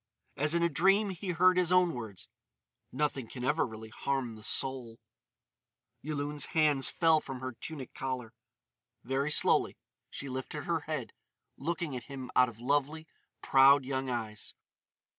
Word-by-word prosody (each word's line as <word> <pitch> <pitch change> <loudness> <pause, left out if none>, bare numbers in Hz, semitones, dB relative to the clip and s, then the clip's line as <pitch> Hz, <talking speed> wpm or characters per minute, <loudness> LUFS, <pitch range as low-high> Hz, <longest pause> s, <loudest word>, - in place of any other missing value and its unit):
As 150 +3 +1
in 170 - +2
a - - +5
dream 195 +6 +3
he 190 +1 -6
heard 180 +2 +4
his 180 -1 +2
own 180 -2 +4
words: 110 -6 -7 0.6
"Nothing 140 -5 -1
can 125 +2 -7
ever 145 +2 +2
really 110 -1 -9
harm 130 +1 -2
the 110 - -12
soul." 125 -1 -1 1.0
Yulun's 145 0 -3
hands 145 -4 +3
fell 160 -2 +4
from 135 -2 -7
her 130 0 -4
tunic 135 +2 -8
collar. 130 -3 -4 0.7
Very 135 +4 -1
slowly - - +3 0.3
she 140 - -6
lifted 130 0 -5
her - - 0
head, - - -4 0.4
looking 160 -1 -3
at 120 -2 -6
him 135 -2 -7
out 125 -1 +5
of 115 -1 -14
lovely, 145 +5 0 0.4
proud 135 0 +6
young 135 0 -2
eyes. 110 -4 -4
135 Hz, 150 wpm, -31 LUFS, 125-155 Hz, 1.0 s, proud